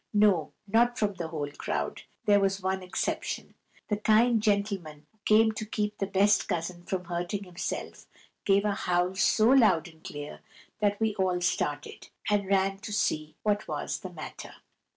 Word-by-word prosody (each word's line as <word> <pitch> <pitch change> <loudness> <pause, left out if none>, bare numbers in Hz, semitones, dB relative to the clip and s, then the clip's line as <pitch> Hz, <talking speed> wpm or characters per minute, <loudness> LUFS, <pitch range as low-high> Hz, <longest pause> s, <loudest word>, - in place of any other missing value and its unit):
No, 205 -6 +4 0.2
not 235 +4 +3
from 210 -2 +1
the 175 -3 -5
whole 150 -3 -4
crowd; - - -3 0.2
there 205 -1 +5
was 195 -1 0
one 190 0 0
exception. 180 -1 -3 0.3
The 210 - 0
kind 220 +2 +4
gentleman 200 -8 -1
who 220 - -36
came 220 +1 +5
to 215 - -5
keep 210 -1 -3
the 195 - 0
best 200 +2 +3
cousin 175 +1 -3
from 185 -1 -3
hurting 175 +3 -3
himself 180 -2 -5 0.4
gave 200 +1 +3
a 210 - +2
howl 180 -1 0
so 215 +4 +3
loud 220 - +5
and 160 -1 -17
clear 145 0 -7 0.4
that 205 -1 +1
we 220 -1 +1
all 185 -2 +1
started, 145 -4 -2 0.2
and 205 -2 +2
ran 195 0 +2
to 215 +1 -7
see 155 -6 -1
what 210 0 0
was - - -3
the - - -7
matter. - - -9
195 Hz, 170 wpm, -28 LUFS, 175-210 Hz, 0.4 s, there